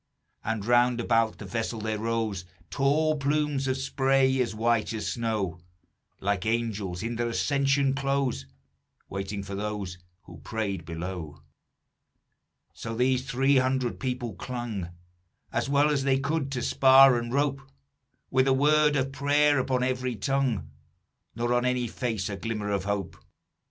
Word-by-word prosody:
And 110 -2 -2
round 120 +1 +3
about 115 -1 +1
the - - -8
vessel 115 0 -3
there 110 0 -2
rose 110 -4 -1 0.3
Tall 150 - +2
plumes 145 -1 0
of 130 0 0
spray 135 0 +2
as 115 -3 -2
white 115 0 +1
as 110 - -3
snow, 105 -7 -2 0.6
Like 100 -2 -1
angels 110 -5 -2
in 115 0 -3
their 120 0 0
ascension 140 +2 +1
clothes, 135 - -1 0.6
Waiting 100 +1 -4
for 100 0 -7
those 100 -3 -4 0.2
who 85 -2 -13
prayed 100 +1 -3
below. 85 -2 -6 1.3
"So 115 0 -6
these 130 +2 +1
three 135 +2 +3
hundred 130 -1 0
people 125 -4 -3
clung 115 -7 -5 0.6
As - - -1
well 145 +2 +3
as 140 -2 0
they 135 -1 +3
could, 140 0 -1
to 125 - -2
spar 135 -1 +7
and 120 0 -5
rope; 140 0 0 0.7
With 130 +1 +3
a 135 - +4
word 150 +2 +4
of 135 -1 0
prayer 145 +1 +3
upon 130 -1 0
every 130 -1 -1
tongue, 115 - -1 0.6
Nor 120 +1 0
on 120 0 +2
any 125 -1 0
face 115 -3 -3
a 100 - -4
glimmer 105 -2 -3
of 100 -1 -1
hope. 100 -3 -3
120 Hz, 145 wpm, -27 LUFS, 105-135 Hz, 1.3 s, spar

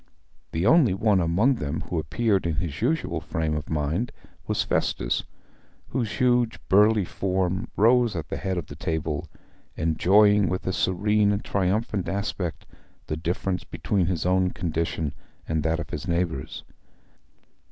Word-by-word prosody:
The 80 +3 -1
only 125 - +5
one 105 -1 +3
among 100 +11 +2
them 75 -1 -3
who 85 - -3
appeared 95 +4 0
in 80 - -1
his 80 0 -3
usual 155 +7 0
frame 80 -1 -2
of 75 - -5
mind 80 +9 -1 0.4
was - - +1
Festus, - - 0 0.6
whose 120 -4 -2
huge, 125 -3 +2
burly 105 +1 +5
form 95 +3 -1
rose 115 0 +4
at 80 -4 -4
the - - -3
head 95 -1 -2
of 85 - -3
the 70 - -10
table, 80 -2 -2 0.5
enjoying 100 +4 +4
with 95 - -3
a 95 - -1
serene 105 +3 +2
and 100 0 -2
triumphant 100 +1 0
aspect 95 -3 -3 0.4
the 75 - -3
difference 90 +3 -2
between 95 -4 -1
his 90 -3 -1
own 90 0 +3
condition 80 -3 -2 0.3
and 80 -1 0
that 80 +2 0
of - - -6
his 75 +6 -5
neighbours. 85 -1 -2
95 Hz, 150 wpm, -25 LUFS, 80-105 Hz, 0.6 s, only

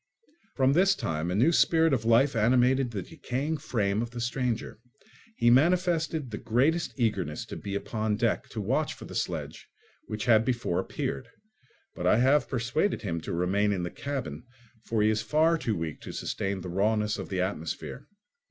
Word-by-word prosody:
From 135 0 +3
this 190 +4 +4
time 80 - -2
a 90 - -1
new 125 +11 +4
spirit 165 -2 +4
of 115 -4 0
life 120 +4 +4
animated 125 +3 +3
the 105 -5 -4
decaying 155 -1 -3
frame 105 -7 -1
of 120 - -3
the 120 0 -7
stranger. 120 -2 -2 0.6
He 120 - +4
manifested 160 -1 +2
the 105 - -5
greatest 140 +7 0
eagerness 95 -10 -1
to - - -8
be 100 -1 -5
upon 110 +1 -1
deck - - 0
to - - -5
watch - - 0
for - - -11
the - - -10
sledge - - -4 0.4
which 110 +1 -4
had 110 -2 +5
before 120 -8 -1
appeared; 70 - -3 0.7
but - - -2
I - - +5
have 130 +3 +3
persuaded 130 - 0
him 85 -5 -2
to - - -6
remain 95 +4 +1
in 95 -3 -1
the 85 - -4
cabin, 130 - -5 0.4
for 110 -2 +1
he 110 - +4
is 110 0 0
far 160 +2 +3
too 120 -9 -1
weak 80 -2 -5
to - - -7
sustain 95 -1 -3
the 90 - -6
rawness 105 +3 +1
of - - -6
the 95 -2 -1
atmosphere. 85 -4 -4
115 Hz, 180 wpm, -28 LUFS, 100-135 Hz, 0.7 s, had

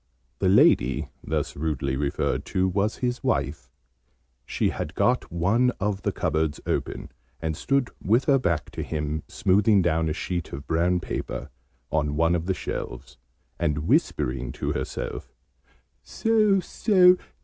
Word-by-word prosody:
The 95 - +2
lady, 65 -8 +4
thus - - -2
rudely 70 -3 -2
referred 70 +1 -1
to, 95 0 +1
was 100 +4 0
his 125 +1 -2
wife. 70 - -1 0.8
She - - 0
had 80 +5 -5
got 125 +1 +1
one 100 +9 +2
of 100 -1 -1
the - - 0
cupboards 80 -1 -1
open, - - -3 0.3
and 80 -1 -2
stood 135 - 0
with 115 +7 +3
her 140 -2 +4
back 85 - -1
to - - -5
him, 75 0 -3
smoothing 100 +1 +3
down 80 -1 +1
a - - 0
sheet 85 +1 -4
of 70 +1 -6
brown 85 +2 +1
paper - - -5 0.4
on 75 -2 0
one 85 +2 +3
of 85 0 -1
the 95 - +1
shelves, - - -6 0.4
and 75 +1 -1
whispering 60 -1 +1
to - - -3
herself - - -4 0.7
"So, 215 -3 +2
so! 180 -2 +4
85 Hz, 145 wpm, -25 LUFS, 75-110 Hz, 0.8 s, lady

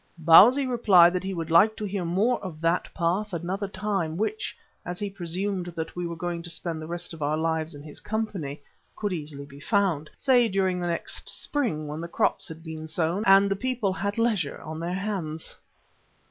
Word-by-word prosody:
Bausi 205 - +7
replied 195 -9 +5
that 180 - -1
he 190 0 -3
would 165 -1 -4
like 210 +7 +6
to 215 - -3
hear 195 -2 -2
more 205 +9 +1
of 175 -5 -7
that 165 +2 0
path 185 +5 -1
another 185 +4 -2
time 195 -5 -2
which, 405 - -2 0.3
as 180 0 -5
he 205 0 -3
presumed 185 +1 -3
that 160 0 -5
we 175 -1 -2
were 170 - -5
going 170 0 -3
to 170 - -6
spend 165 -1 -3
the 155 - -7
rest 175 +1 -4
of 160 - -10
our 150 +1 0
lives 160 -1 -1
in 145 - -10
his 150 -1 -5
company, 200 -10 -3 0.4
could 205 -3 -2
easily 145 -4 -6
be 140 0 -13
found 175 -4 +1
say 250 -4 +4
during 190 -2 0
the 175 - -1
next 170 -1 -2
spring 210 - -2
when 150 +2 -5
the 170 - -5
crops - - 0
had 160 0 -9
been 160 -1 -7
sown 170 +5 -1
and 195 +1 +7
the - - +2
people 235 -3 -1
had 200 +2 -3
leisure 215 -10 0
on 155 0 -6
their 170 +1 -3
hands. 185 -6 -4
175 Hz, 200 wpm, -26 LUFS, 160-200 Hz, 0.4 s, Bausi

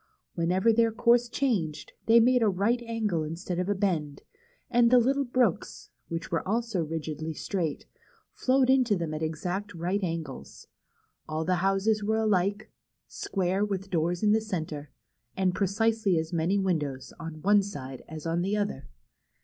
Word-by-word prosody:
Whenever 185 +6 +2
their 230 0 +3
course 235 +2 +3
changed, 205 - -1
they 230 +1 +7
made 250 +2 +4
a 225 - +4
right 205 +6 +1
angle 215 -8 -1
instead 170 +3 -4
of 180 +2 -1
a 205 - +2
bend, 165 -8 -1 0.4
and 240 -1 +4
the 250 - +6
little 270 +3 +2
brooks, 245 -6 -1 0.2
which 165 0 -5
were 165 - +1
also 225 -4 0
rigidly 155 0 -4
straight, 165 -6 -3 0.5
flowed 260 0 +2
into 255 -5 +4
them 165 -4 -3
at 155 - -4
exact 180 +6 -3
right 180 +4 -1
angles. 165 - -5 0.6
All 155 +1 -2
the 180 +1 +1
houses 195 +3 +1
were 220 +2 +1
alike, 205 0 0 0.4
square, 190 +1 -1
with 195 -1 -3
doors 175 +1 0
in 210 - +4
the 220 +1 +3
centre, 160 -8 -4 0.5
and 185 -1 +2
precisely 205 0 +1
as 160 +2 -2
many 170 +4 +1
windows 150 -9 -2
on 165 -1 -7
one 205 +1 +5
side 135 -10 -7
as 155 0 -8
on 165 +1 0
the 195 +3 0
other. 200 -11 -3
190 Hz, 160 wpm, -28 LUFS, 165-220 Hz, 0.6 s, they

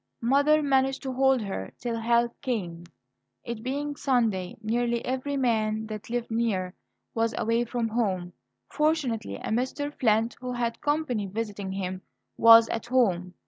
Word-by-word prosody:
Mother 285 +5 +3
managed 270 -1 +1
to 265 -1 -3
hold 265 -2 +3
her 145 - -5
till 235 -2 -3
help 235 +1 +1
came. 180 -10 -3 0.6
It 235 -2 -5
being 285 +4 -3
Sunday, 225 -10 0
nearly 235 +2 -1
every 265 +2 -2
man 220 -4 0
that 215 0 -7
lived 235 -1 -3
near 205 -6 0 0.4
was 225 0 0
away 230 +1 +1
from 235 -1 -2
home. 190 -6 -1 0.3
Fortunately, 280 - 0
a - - -6
Mr. 260 +5 -1
Flint, 225 -3 +1
who 250 -1 -4
had 235 -1 -2
company 290 -9 0
visiting 205 -1 -4
him, 185 -1 -4 0.3
was 230 0 +8
at 230 - -3
home. 185 -8 +1
235 Hz, 145 wpm, -27 LUFS, 215-260 Hz, 0.6 s, was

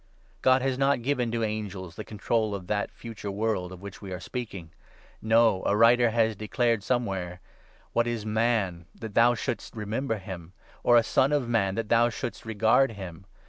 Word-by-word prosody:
God 130 0 +4
has 135 -1 0
not 135 -3 +2
given 125 -3 0
to 115 -1 -1
angels 100 -5 -4
the 110 - -6
control 110 0 -1
of 95 -2 -7
that 105 +2 -1
Future 115 -3 -9
5 100 - -5
World 105 -4 -1
of 95 +1 -11
which 100 -1 -9
we 100 -2 -8
are 90 - -4
speaking! 100 -10 -6 0.5
No; 110 -3 +4
a 105 - +2
writer 120 +2 +6
has 110 -1 +2
declared 115 +2 0
6 100 - -16
somewhere 95 -8 -1
— - - -30
' - - -32
What 120 0 +2
is 115 -3 -3
Man 105 -6 0
that 110 -2 -8
thou 120 +2 +5
should'st 110 - -4
remember 110 +3 -2
him? 95 -3 -9 0.3
Or 120 - +5
a 115 - +5
Son 130 +4 +2
of 145 -5 +1
Man 100 -5 +1
that 115 -2 -3
thou 120 +1 +4
should'st 115 0 -6
regard 110 +3 +3
him 95 -3 -9
110 Hz, 200 wpm, -27 LUFS, 100-120 Hz, 0.5 s, writer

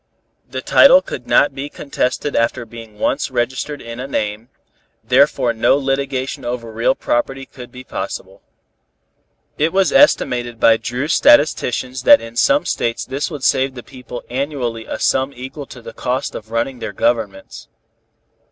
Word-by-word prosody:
The - - -5
title - - +6
could - - -7
not 145 -1 +4
be 140 +2 -6
contested 140 0 -2
after 115 +1 0
being 115 -2 -12
once 135 +7 -1
registered 130 +3 -3
in 115 +1 -8
a 130 - -5
name, 105 -2 -3 0.5
therefore 125 -2 +3
no 115 +4 +3
litigation 135 0 -2
over 120 -2 -4
real 115 +4 +1
property 135 +3 -2
could 125 -2 -12
be 125 +1 -10
possible. - - -6 1.2
It 155 +2 +2
was 195 0 +2
estimated 120 - +3
by 115 0 +5
Dru's 125 +7 -2
statisticians 130 -1 +3
that 190 +9 +7
in 115 0 -10
some 285 - +3
States 115 -1 -2
this 135 +5 -3
would 150 -5 -7
save 135 0 +2
the 120 - -8
people 125 -1 -9
annually 125 -4 -3
a - - -4
sum 135 +1 +1
equal 130 +3 -8
to 125 - -12
the 115 - -9
cost 125 +3 -2
of 110 - -8
running 120 +3 -2
their - - -5
governments. 105 -5 -2
130 Hz, 155 wpm, -18 LUFS, 115-140 Hz, 1.2 s, that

